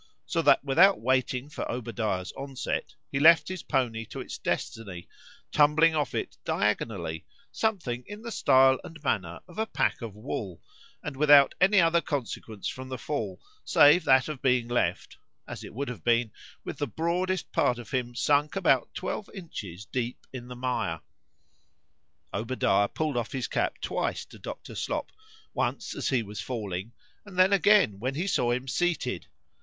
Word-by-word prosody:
So - - 0
that - - +4
without 175 +8 +5
waiting 130 +1 0
for 150 - -5
Obadiah's 110 -6 -3
onset, 135 -1 -4 0.2
he 140 - 0
left 160 +3 +7
his 185 -2 -4
pony 115 -4 -1
to - - -8
its - - -7
destiny, 100 -6 -4 0.4
tumbling 155 +2 +5
off 150 -3 -1
it - - -4
diagonally, 100 -6 -1 0.2
something 170 - -1
in 205 +2 -9
the 235 - -5
stile 130 -7 +5
and 165 - -10
manner 95 - -1
of 175 +3 -10
a 220 - 0
pack - - 0
of 110 -4 -6
wool, 105 - -5 0.4
and 145 - -5
without 145 0 +6
any 195 +2 +6
other 170 -1 +4
consequence 115 -8 -4
from 130 0 -6
the 130 - -4
fall, 110 -9 -4 0.2
save 150 +4 +6
that 130 -2 +5
of 150 -4 -6
being 125 -2 +2
left 120 0 -1 0.3
(as - - -7
it - - -9
would 140 +5 -4
have 120 -9 -7
been) 115 -1 +2 0.3
with - - -6
the 145 - -1
broadest 175 - -1
part 125 - +2
of 120 - -10
him 120 -2 -2
sunk 145 +5 +2
about 165 -10 +2
twelve 210 - -4
inches 105 - -7
deep 125 -1 -4
in 125 -2 -7
the 125 - -8
mire. 115 -9 -2 1.3
Obadiah 110 -2 +1
pull'd 155 0 -2
off 120 -2 -2
his 130 -4 -2
cap - - -1
twice - - -2
to - - -15
Dr. - - -8
Slop;—once 435 0 -4
as - - -1
he 125 -4 +1
was 105 0 -7
falling,—and 115 - -7
then 185 +2 +5
again 195 - +4
when 130 +5 -2
he 170 +5 -1
saw 125 -11 +1
him 125 +2 -1
seated. 175 +5 -1
130 Hz, 165 wpm, -28 LUFS, 115-160 Hz, 1.3 s, left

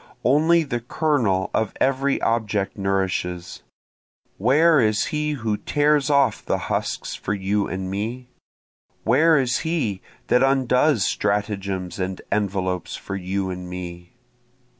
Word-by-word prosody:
Only 160 +6 +4
the 135 -5 -3
kernel 120 -7 0
of 110 -2 0
every 135 +1 +1
object 105 -3 0
nourishes; 95 -3 -2 0.8
Where 150 - +4
is 110 -3 +2
he 150 0 0
who 110 -6 -2
tears 145 +1 +1
off 140 -6 +2
the - - 0
husks - - -3
for 100 - -3
you 100 +1 0
and 95 0 -4
me? 115 +6 -4 0.7
Where 155 +7 +4
is 125 -2 +1
he 145 - -1 0.2
that 125 - +3
undoes 135 -3 +3
stratagems 100 -3 -2
and 95 0 -3
envelopes 95 -3 -1
for 95 - -6
you 95 0 -2
and 90 0 -7
me? 90 -1 -8
105 Hz, 125 wpm, -23 LUFS, 95-135 Hz, 0.8 s, Only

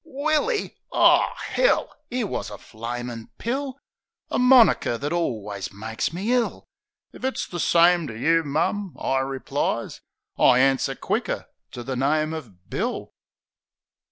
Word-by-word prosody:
Willy! 310 - -1
O - - +6 0.3
'ell! - - +2
'Ere 245 -2 -1
wus 195 - -4
a 105 - -8
flamin' 120 +1 -6
pill! 265 +2 -3 0.5
A - - +1
moniker 250 - +5
that 145 +5 -3
alwus 105 - -3
makes 110 +6 -3
me 195 +8 -1
ill. 245 -2 0 0.5
"If - - -13
it's 265 0 -1
the 175 - -6
same 170 0 +4
to 110 -4 -7
you, 165 +7 +3
mum," 170 +6 -1
I 135 - +1
replies 135 0 -2 0.4
"I 125 - +6
answer 135 0 +2
quicker - - -2 0.3
to 120 - -6
the 130 +1 -4
name 155 +4 +1
of 110 - -9
Bill." - - -3
155 Hz, 135 wpm, -24 LUFS, -, 0.5 s, O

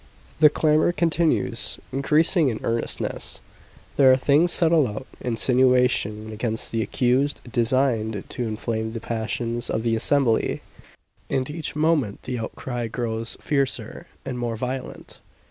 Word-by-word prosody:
The 155 -1 +8
clamour 155 +3 +2
continues, 170 -1 0 0.2
increasing 150 +3 +3
in 110 - -4
earnestness. 115 0 -1 0.6
There 135 -2 +7
are 130 - +5
things 150 +6 +3
said 165 -2 +5
aloud 130 -7 +1
insinuations 125 -3 +2
against 110 +1 -3
the 115 - -1
accused 130 +5 0
designed 115 -3 +1
to 120 - -4
inflame 110 0 -3
the 115 - -4
passions 115 +1 -3
of 110 - -1
the 115 -1 +1
assembly; 120 0 +1 0.7
and 130 -1 -1
each 160 -1 -4
moment 150 -9 0
the 125 -2 -4
outcry 120 +1 -5
grows 115 0 -4
fiercer 140 -3 -1 0.2
and 125 - -4
more 120 -1 -2
virulent. 130 +3 -6
125 Hz, 130 wpm, -23 LUFS, 115-140 Hz, 0.7 s, The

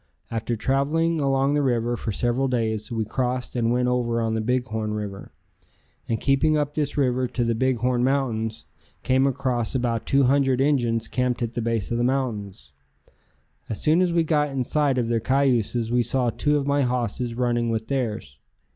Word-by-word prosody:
After 115 +1 -2
traveling 150 +7 +1
along 135 0 +2
the 145 - +2
river 120 -3 0
for 115 - -4
several 120 +5 0
days 110 -2 -1
we 110 -2 -1
crossed 125 +3 -2
and 115 -1 +1
went 125 0 +1
over 120 -2 0
on 115 -1 0
the 110 - 0
Big 125 +2 0
Horn 110 -2 -3
River, 100 -2 -6 0.8
and 115 -1 0
keeping 150 +3 +2
up 145 -1 -1
this 150 -2 -2
river 130 -2 +1
to 120 - -2
the 115 0 +1
Big 130 +2 +1
Horn 125 0 0
Mountains, 120 -5 -1 0.4
came 130 +1 +3
across 130 -3 -1
about 120 -3 -1
two 140 0 +3
hundred 135 0 +3
Injuns 120 -5 +1
camped 125 -1 -1
at 115 0 -3
the 120 - -2
base 115 -3 -1
of 120 - 0
the - - +1
mountains. 110 - -2 1.0
As 110 - -3
soon 160 +4 +3
as 180 -1 +2
we 170 -1 +2
got 150 -2 +1
in 135 -2 -2
sight 145 0 +1
of 120 -2 0
their 115 0 +1
cayuses 120 -2 +1
we 120 0 +3
saw 120 0 0
two 150 +5 +1
of 140 - -2
my 140 0 +2
hosses 125 -1 -1
running 120 -1 0
with 110 -1 -2
theirs. 110 - -3
125 Hz, 190 wpm, -24 LUFS, 115-135 Hz, 1.0 s, came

